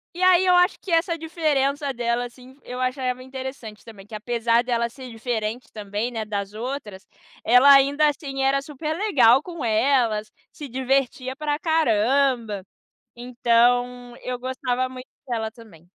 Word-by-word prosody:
e 360 - -6
aí 370 0 +5
eu 360 - +4
acho 360 +2 +3
que 380 - -8
essa 335 +1 +2
diferença 290 -3 0
dela, 240 0 -1
assim, 250 +2 -14
eu 250 +1 -7
achava 255 0 -2
interessante 260 -5 -8
também, 210 -4 -13
que 215 - -16
apesar 235 +2 +1
dela 235 -1 0
ser 255 +1 -11
diferente 225 0 -4
também, 210 +2 -4
né, 225 -2 -3
das 205 -1 -4
outras, 220 -4 -6 0.4
ela 250 +5 +6
ainda 285 +2 +4
assim 275 -2 -3
era 275 +1 +2
super 300 +2 -5
legal 270 - +4
com 335 -7 -6
elas, 220 -2 +1 0.2
se 290 - -9
divertia 260 0 -1
pra 295 0 -2
caramba. 250 - +1 0.5
Então, 245 0 +1
eu 250 0 -4
gostava 255 0 -2
muito 255 0 -10 0.2
dela 225 -3 -2
também. 215 -9 -16
250 Hz, 150 wpm, -23 LUFS, 230-275 Hz, 0.5 s, ela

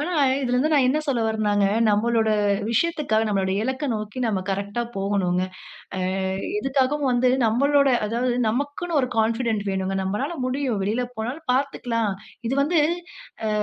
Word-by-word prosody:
ஆனா, 345 +5 -2 0.3
இதுல 250 -1 +1
வந்து 310 +4 +1
நான் 275 -4 +4
என்ன 295 +4 +2
சொல்ல 260 -5 +1
வர்றேன்னாங்க, 210 -2 +1 0.3
நம்மளோட 225 +1 +2 0.4
விஷயத்துக்ககாக 245 -5 +1
நம்மளுடைய 195 -2 0
இலக்க 260 +3 -2
நோக்கி, 215 +2 -5
நம்ம 205 -4 0
கரெக்ட்டா 200 +4 -2
போகனுங்க. 195 -2 0 0.6
ஆ - - -2 0.6
எதுக்காகவும் 270 0 +1
வந்து 245 +1 +3 0.2
நம்மளோட 280 +5 +3 0.2
அதாவது, 240 +3 0
நமக்குன்னு 285 +7 -2
ஒரு 255 - -1
கான்ஃபிடன்ட் 225 -1 +1
வேணுங்க. 190 0 -2
நம்பலால 255 - -2
முடியும். 255 -4 -1
வெளில 220 +5 0
போனாலும் 255 +8 -5
பாத்துக்கலாம். 240 -5 -1 0.3
இது 260 - -1
வந்து 325 +3 +2 0.7
ஆ - - 0
240 Hz, 140 wpm, -24 LUFS, 210-275 Hz, 0.7 s, நான்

